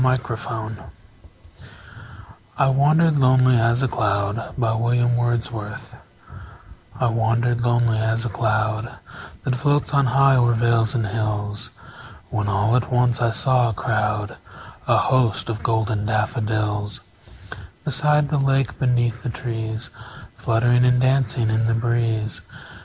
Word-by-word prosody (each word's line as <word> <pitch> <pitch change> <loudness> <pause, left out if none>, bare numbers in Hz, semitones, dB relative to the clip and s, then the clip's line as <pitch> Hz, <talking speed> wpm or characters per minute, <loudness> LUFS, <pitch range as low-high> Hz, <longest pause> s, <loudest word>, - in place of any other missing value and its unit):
William 130 -1 +2
Wordsworth 110 -2 -6 1.7
I 135 - +3
Wandered 150 +4 +3
Lonely 130 -1 +4
As 115 +3 +2
a - - +2
Cloud 100 -3 -1 2.6
I - - +1
WANDERED 115 +1 0
lonely 120 -2 +1
as 110 +1 -1
a - - -2
cloud 110 +2 -1 0.5
That 130 - -1
floats 145 +3 0
on 140 -2 +3
high 135 +1 +4
o'er 120 -1 +3
vales 115 -1 +1
and 115 -3 0
hills, 105 -1 -3 0.6
When 105 -1 -2
all 105 +3 +1
at 125 0 -1
once 125 -1 +1
I 120 - +2
saw 125 +1 +2
a - - -3
crowd, 105 -1 -2 0.5
A - - +4
host, 125 -5 +1
of 110 -2 -4
golden 110 -2 -1
daffodils; 105 -1 -2 0.8
Beside 150 0 +1
the 150 - 0
lake, 135 -2 0
beneath 120 -2 0
the 125 - -4
trees, 115 -1 -5 0.4
Fluttering 120 +2 +2
and 125 0 +3
dancing 130 -3 +1
in 110 +1 +1
the 115 0 +1
breeze. 115 -2 -1
115 Hz, 125 wpm, -21 LUFS, 110-125 Hz, 2.6 s, Lonely